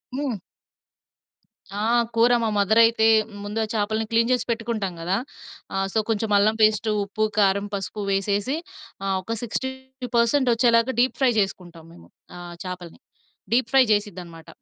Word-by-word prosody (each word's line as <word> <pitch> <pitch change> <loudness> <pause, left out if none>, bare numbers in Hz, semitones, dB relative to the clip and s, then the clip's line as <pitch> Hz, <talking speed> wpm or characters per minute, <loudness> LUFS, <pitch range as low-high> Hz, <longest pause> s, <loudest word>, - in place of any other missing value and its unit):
హ్మ్. 265 -7 -3 1.4
ఆ! - - -2 0.3
కూర 230 +2 +4
మా 225 - +1
మదర్ 205 +3 +3
అయితే, 225 -1 +2 0.4
ముందు 205 +2 -4
ఆ - - 0
చాపల్ని 220 +1 -1
క్లీన్ 230 +1 +2
చేసి 250 -1 +1
పెట్టుకుంటాం 225 -4 -3
గదా! 180 +4 0 0.6
ఆహ్, 195 0 0
సో, 220 - +2
కొంచెం 225 0 -1
అల్లం 215 +2 +3
పేస్ట్, 215 +1 +3
ఉప్పు, 210 +2 -1
కారం, 200 0 +2
పసుపు 200 +1 -4
వేసేసి 200 +6 0 0.5
ఆహ్, 195 -1 0
ఒక 230 +5 -4
60% 260 0 -1
వచ్చేలాగా 230 +1 +3
డీప్ 255 - +1
ఫ్రై 260 -2 +4
చేసుకుంటాం 180 -4 -4
మేము 175 - -16 0.3
ఆహ్, 175 -1 -9
చాపల్ని. 180 -2 -8 0.5
Deep 235 -1 +2
fry 270 -1 +7
చేసిద్దనమాట. 180 -6 -5
215 Hz, 145 wpm, -23 LUFS, 195-235 Hz, 1.4 s, ఫ్రై